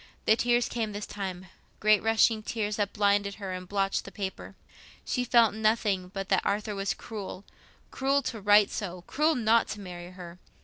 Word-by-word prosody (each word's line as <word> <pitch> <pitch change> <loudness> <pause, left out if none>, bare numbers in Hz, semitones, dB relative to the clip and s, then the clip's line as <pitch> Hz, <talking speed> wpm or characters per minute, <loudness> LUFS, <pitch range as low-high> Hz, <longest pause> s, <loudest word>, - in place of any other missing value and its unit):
The 220 - +5
tears 240 +1 +2
came 220 -3 -3
this 205 +1 -4
time—great 195 +2 -1
rushing 225 0 +3
tears 210 -1 -3
that 205 -1 0
blinded 200 -1 +1
her 195 -3 -5
and 185 0 -7
blotched 195 -1 0
the 195 - -10
paper. 195 -2 -6 0.5
She 250 - -1
felt 235 -3 +4
nothing 215 -4 +1
but 195 +1 -5
that 190 - +3
Arthur 210 +1 -1
was 195 0 -2
cruel—cruel 235 +6 -4
to 225 -4 -4
write 205 0 +5
so, 180 -4 -5
cruel 310 +2 +1
not 230 -1 +3
to 210 - -6
marry 175 -2 -8
her. 180 -1 -11
205 Hz, 170 wpm, -28 LUFS, 195-225 Hz, 0.5 s, The